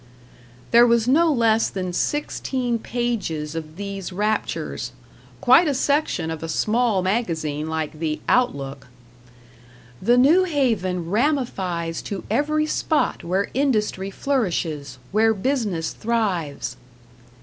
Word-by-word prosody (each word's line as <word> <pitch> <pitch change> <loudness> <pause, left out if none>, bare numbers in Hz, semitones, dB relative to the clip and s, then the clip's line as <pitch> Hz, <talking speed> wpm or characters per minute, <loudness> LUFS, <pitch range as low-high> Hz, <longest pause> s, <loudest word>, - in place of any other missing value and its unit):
There 235 +1 +7
was 235 -1 +3
no 320 +5 +4
less 230 -4 +3
than 185 -2 -4
sixteen 255 -1 -1
pages 220 -11 -2
of 155 -1 -6
these 195 -1 -5
raptures 210 +3 -2 0.5
quite 260 +7 +6
a 285 - +1
section 280 - 0
of 160 - -5
a 165 - -5
small 215 +3 +1
magazine 160 -7 -1
like 160 -1 -3
the 155 -2 -2
"Outlook". 140 - 0 1.1
"The 240 +1 +4
New 320 +9 +5
Haven 200 - 0
ramifies 195 - 0
to 200 -2 -5
every 305 +1 +1
spot 310 0 0
where 190 +4 -1
industry 215 -8 0
flourishes, 170 - -2
where 220 +2 +3
business 205 - -1
thrives." 180 - -2
210 Hz, 115 wpm, -23 LUFS, 165-250 Hz, 1.1 s, There